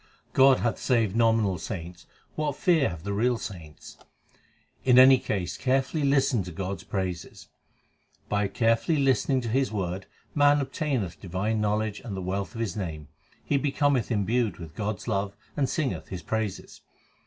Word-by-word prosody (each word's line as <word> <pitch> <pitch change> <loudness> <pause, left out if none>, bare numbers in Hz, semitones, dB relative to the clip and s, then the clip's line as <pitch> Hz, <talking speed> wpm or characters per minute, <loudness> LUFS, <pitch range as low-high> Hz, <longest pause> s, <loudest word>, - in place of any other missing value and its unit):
God 135 -1 +6
hath 115 -2 0
saved 115 -6 +1
nominal 110 -5 +2
saints: 85 -1 -7 0.3
what 150 -3 -2
fear 160 -3 +3
have 85 -3 -8
the 100 +1 -3
real 120 +4 +1
saints? 85 -9 -9 0.8
In 125 -1 +5
any 130 0 +8
case 95 -7 -3
carefully 135 +4 0
listen 135 -4 +2
to 90 -1 -7
God 95 +3 -4
s - - -12
praises. 90 -3 -5 0.8
By 105 -1 +1
carefully 115 +9 +1
listening 135 -1 +2
to 120 - -5
His 130 +3 +1
word 95 -2 -3 0.3
man 145 0 +5
obtameth 135 - -2
divine 100 +4 -2
knowledge 105 0 0
and 100 -5 -6
the - - -3
wealth 95 +5 -3
of 115 - -3
His 110 -2 -2
name. 80 -7 -5 0.4
He 140 - +2
becometh 140 -3 +1
imbued 115 +1 0
with 80 -3 -9
God 105 +2 -2
s 95 - -13
love 100 -3 -1 0.2
and 135 -3 +1
singeth 150 -5 -2
His 90 -3 -7
praises. 110 0 -4
110 Hz, 165 wpm, -27 LUFS, 95-130 Hz, 0.8 s, any